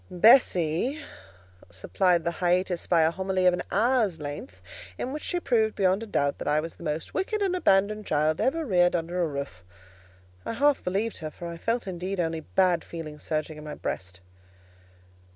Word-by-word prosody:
Bessie 185 - +4 0.7
supplied 170 - +1
the 170 - 0
hiatus 180 0 +1
by 170 -2 +4
a 160 - +3
homily 190 +1 -1
of 180 - +6
an 180 - -2
hour's 220 -5 +2
length, 145 -11 -7 0.4
in 260 - -4
which 300 - -5
she 355 - -2
proved 220 -8 +1
beyond 190 +1 +2
a 225 - -6
doubt 140 -8 0
that - - -5
I 150 +1 +3
was 165 +2 -5
the - - -13
most 155 0 -4
wicked 425 +3 -1
and 375 -2 +1
abandoned 210 - +2
child 155 +1 +1
ever 320 +4 0
reared 175 -6 +3
under 175 +2 -2
a 170 - +1
roof. 140 - -6 0.8
I - - -4
half 285 +4 +2
believed 200 +5 -2
her; 155 - -5
for 170 +3 -9
I 170 0 -6
felt 230 +7 -1
indeed 185 +1 -4
only 165 -1 -1
bad 180 +1 +1
feelings 155 -3 -8
surging 155 0 -3
in - - -10
my 150 -1 -6
breast. 95 0 -5
180 Hz, 185 wpm, -27 LUFS, 155-215 Hz, 0.8 s, of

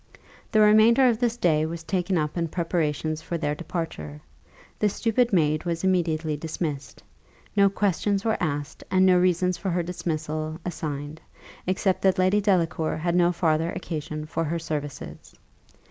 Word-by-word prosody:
The 215 - +4
remainder 220 +5 +6
of 230 -3 +2
this 240 -1 0
day 155 -7 +2
was 165 +1 -4
taken 185 +1 0
up 150 -1 -1
in 170 -1 -1
preparations 160 -2 -1
for 170 - -4
their 150 -2 -1
departure. 150 - -5 0.6
The 210 - +3
stupid 230 +3 +1
maid 155 -5 +2
was 170 0 -3
immediately 165 -4 +1
dismissed. 150 -2 -5 0.5
No 200 -1 +5
questions 200 +1 0
were 220 -1 0
asked, 145 -2 -3
and 185 0 +4
no 180 -1 +5
reasons 180 0 +2
for 195 - -2
her 175 0 0
dismissal 155 -2 -3
assigned, 155 -2 -5 0.5
except 185 0 +1
that 190 -1 +3
Lady 185 +3 +3
Delacour 175 -5 +1
had 170 +2 -1
no 175 0 +4
farther 165 -1 +1
occasion 155 -1 -5
for 160 +1 -2
her 165 +2 -2
services. 150 -3 -6
170 Hz, 155 wpm, -25 LUFS, 155-185 Hz, 0.6 s, remainder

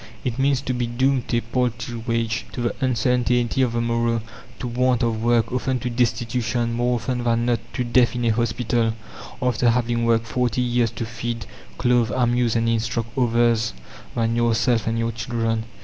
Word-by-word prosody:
It 125 0 -2
means 135 -1 +2
to 130 -2 -2
be 120 -1 -1
doomed 130 +1 +1
to 120 - +1
a - - +1
paltry 120 -1 -2
wage, 115 -1 -1
to 125 - -4
the 120 - -1
uncertainty 125 0 +1
of 125 -3 +1
the 120 - 0
morrow, 115 -1 0 0.3
to 125 - -4
want 125 0 +1
of 115 -2 0
work, 120 -1 +2
often 130 +1 0
to 125 - -2
destitution, 120 0 0
more 120 +1 +1
often 120 +1 -2
than 115 0 +1
not 120 -1 +2
to 125 - -1
death 120 -1 +3
in 120 -1 -1
a - - +3
hospital, 115 0 0 0.5
after 125 -1 +2
having 120 0 +1
worked 115 -1 +2
forty 125 +1 0
years 120 -1 +1
to 115 - -5
feed, 115 0 -4 0.3
clothe, 120 -2 +2
amuse, 120 -1 +2
and 115 0 +1
instruct 115 0 -1
others 120 -3 +2 0.4
than 115 0 +1
yourself 115 0 +2
and 115 0 0
your 115 0 0
children. 115 -1 -2
120 Hz, 180 wpm, -23 LUFS, 115-125 Hz, 0.5 s, death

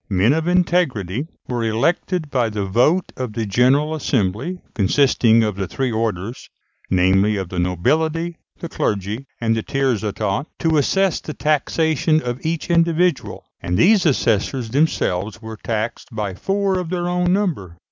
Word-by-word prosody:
Men 100 +6 +3
of 160 +1 -1
integrity 160 - +1 0.2
were 120 -2 -2
elected 155 - 0
by 120 -4 +1
the 105 -2 -3
vote 125 - +2
of 125 -4 -4
the 115 0 -2
General 130 +9 +2
Assembly, 130 - -1
consisting 115 +1 +3
of 105 -3 -2
the 95 -2 -2
three 125 +9 -2
orders 110 0 -3 0.4
namely, 95 +3 +3
of 95 -3 -4
the 90 - -3
nobility, 160 - 0 0.2
the 170 - -4
clergy, 105 - -2
and 115 -1 +1
the 115 - -1
tiers 135 -3 0
état 105 +5 -2
to 160 -2 +1
assess 195 +5 +1
the 155 - -8
taxation 155 +1 +1
of 125 -3 -5
each 165 +1 -2
individual; 170 -1 +1 0.2
and 90 +1 -1
these 195 - +4
assessors 120 -2 0
themselves 110 - 0
were 110 -1 -8
taxed 110 0 -3
by 105 -4 -3
four 195 - 0
of 180 -3 -5
their 175 -1 -2
own 180 0 +1
number. 160 - -1
125 Hz, 155 wpm, -20 LUFS, 105-160 Hz, 0.4 s, these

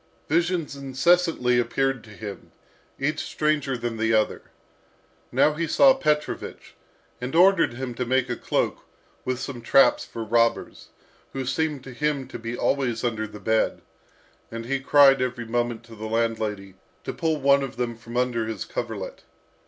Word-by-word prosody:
Visions 170 -1 0
incessantly 140 -2 +2
appeared 135 +1 0
to 115 - -15
him, 105 -1 -9 0.5
each 150 +3 -1
stranger 150 -4 -1
than 120 -1 -4
the 110 0 +1
other. 110 -1 +1 0.9
Now 150 - +4
he 165 +2 -2
saw 270 - +6
Petrovich, 150 - -2 0.5
and 125 +4 -4
ordered 185 -5 +5
him 130 -1 -4
to 125 - -3
make 130 +1 +2
a 120 - -2
cloak, - - -1 0.4
with 130 0 -1
some 125 -1 -6
traps 135 +4 +4
for 115 - -6
robbers, 115 +1 0 0.5
who 135 -1 -3
seemed 145 +1 -1
to 130 - -9
him 145 0 -1
to - - -7
be 115 +1 -5
always 125 -5 0
under 110 -3 -1
the 105 - -11
bed; 110 +1 0 0.7
and 115 0 -6
he 135 +2 -1
cried 135 -1 +6
every 125 -2 -2
moment 120 0 -2
to 115 0 -13
the 110 0 -6
landlady 110 -4 -2 0.3
to - - -4
pull 160 -2 -1
one 140 0 +4
of 135 -2 -5
them 120 -1 -2
from 115 +1 -8
under 120 -3 0
his 110 -3 -4
coverlet. - - -5
125 Hz, 160 wpm, -25 LUFS, 115-140 Hz, 0.9 s, saw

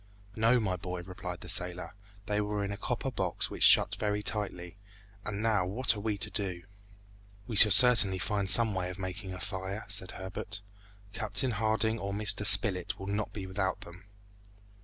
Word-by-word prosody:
"No, 115 +3 +2
my 95 -5 -2
boy," 90 0 -7
replied 90 0 -8
the - - -10
sailor; 90 0 -1 0.3
"they 105 -1 -1
were 105 0 -3
in 100 - -5
a - - -4
copper - - -4
box - - -3
which - - -8
shut - - +4
very 105 0 -2
tightly; 100 -4 -4 0.5
and 105 +1 -5
now 110 -4 +1
what 115 +4 0
are - - -7
we 105 0 -3
to 95 - -3
do?" 95 -4 -3 0.8
"We 120 - -6
shall 105 - +8
certainly 105 -3 +7
find 100 +1 -1
some 115 -1 +5
way 90 -1 -3
of 90 - -8
making 95 +1 -7
a 90 - -8
fire," 95 +1 -5
said 95 - +1
Herbert. 100 +2 -7 0.5
"Captain 115 +4 -1
Harding 110 +1 -1
or 100 0 -5
Mr. 105 0 +1
Spilett 95 -6 +4
will 95 - -9
not 100 +2 -3
be 100 -3 -7
without 95 0 -3
them." 90 +2 -13
100 Hz, 180 wpm, -29 LUFS, 95-110 Hz, 0.8 s, shall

